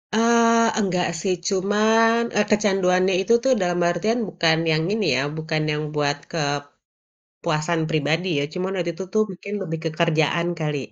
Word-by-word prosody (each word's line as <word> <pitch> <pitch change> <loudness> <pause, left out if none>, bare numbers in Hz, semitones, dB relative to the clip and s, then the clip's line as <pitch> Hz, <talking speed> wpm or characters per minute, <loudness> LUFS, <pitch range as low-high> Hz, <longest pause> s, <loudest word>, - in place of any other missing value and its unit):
Eee, 230 0 +4
enggak 180 -3 0
sih 190 +1 0
cuman 215 +4 +2 0.2
e - - +4
kecanduannya 190 -3 +2
itu 210 +4 +1
tuh 265 - +2
dalam 175 -1 0
artian 215 +8 0
bukan 160 -2 +2
yang 155 0 +1
ini 215 -3 -1
ya - - +1 0.2
bukan 155 0 -2
yang 150 0 -2
buat 145 0 0 1.0
kepuasan 160 0 -2
pribadi 160 +3 0
ya. 145 - 0
Cuman 185 +1 -3
waktu 170 -1 -1
itu 190 - -6
tuh 215 - +3
mungkin 200 +3 -8
lebih 165 -3 -4
ke - - +1
kerjaan 170 0 +1
kali, 150 -2 -2
180 Hz, 160 wpm, -22 LUFS, 160-210 Hz, 1.0 s, Eee